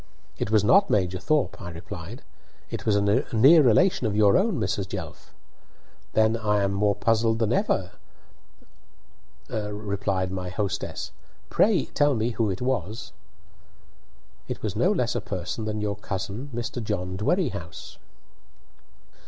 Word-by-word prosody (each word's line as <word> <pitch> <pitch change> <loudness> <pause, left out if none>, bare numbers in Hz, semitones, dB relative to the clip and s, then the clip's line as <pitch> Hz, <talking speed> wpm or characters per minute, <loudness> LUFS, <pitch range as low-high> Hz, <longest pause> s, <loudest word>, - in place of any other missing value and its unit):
"It - - -1
was 110 -2 +3
not 195 - +5
Major 95 -2 +1
Thorp," 150 +8 0
I 85 - -6
replied; 85 - -8 0.5
"it - - -5
was 105 - +4
a 100 0 +2
near 140 +9 +7
relation 130 - +3
of 105 - -2
your 105 -1 +5
own, 195 - +2
Mrs. 100 -1 -1
Jelf." 95 -5 -7 0.8
"Then 110 +1 +3
I 105 -3 +1
am 100 0 0
more 100 0 +2
puzzled 115 0 +2
than 115 -2 +1
ever," - - 0 1.6
rep! 100 -3 -2
my 90 -1 -4
hostess. 100 0 -3 0.4
"Pray - - +3
tell 145 -1 +2
me 115 +2 0
who 115 -2 0
it 95 +5 -3
was." 115 -5 -3 1.3
"It - - -6
was - - -2
no - - +3
less - - 0
a - - -2
person 90 +4 -4
than 105 0 -3
your 105 -1 -2
cousin, 105 +6 -5
Mr. 120 0 -4
John 95 -4 -3
Dwerrihouse." 105 - -2
105 Hz, 140 wpm, -25 LUFS, 95-115 Hz, 1.6 s, near